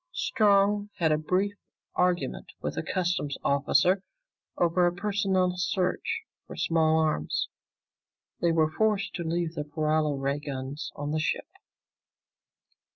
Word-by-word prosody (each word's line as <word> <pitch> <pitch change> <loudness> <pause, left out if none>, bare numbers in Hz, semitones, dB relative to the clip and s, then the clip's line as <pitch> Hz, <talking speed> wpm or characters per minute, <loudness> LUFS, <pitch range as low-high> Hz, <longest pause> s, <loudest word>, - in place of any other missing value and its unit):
Strong 205 - +3
had 165 -5 +2
a 155 - +4
brief 185 +6 0 0.4
argument 180 -1 0
with - - -3
a - - -1
customs 175 -6 -1
officer 160 +7 +3 0.6
over 175 +1 +3
a - - +2
personal 190 -1 +1
search 185 - 0 0.3
for - - -8
small 160 -1 +2
arms. 155 - 0 0.9
They 170 - +2
were 160 -1 +2
forced 210 +1 +1
to 175 - -3
leave 170 0 -1
their 150 - -3
paralo 155 0 0
ray 140 +1 0
guns 140 +1 -5
on 145 0 -4
the 155 - 0
ship. 155 - -1
170 Hz, 130 wpm, -28 LUFS, 155-190 Hz, 0.9 s, a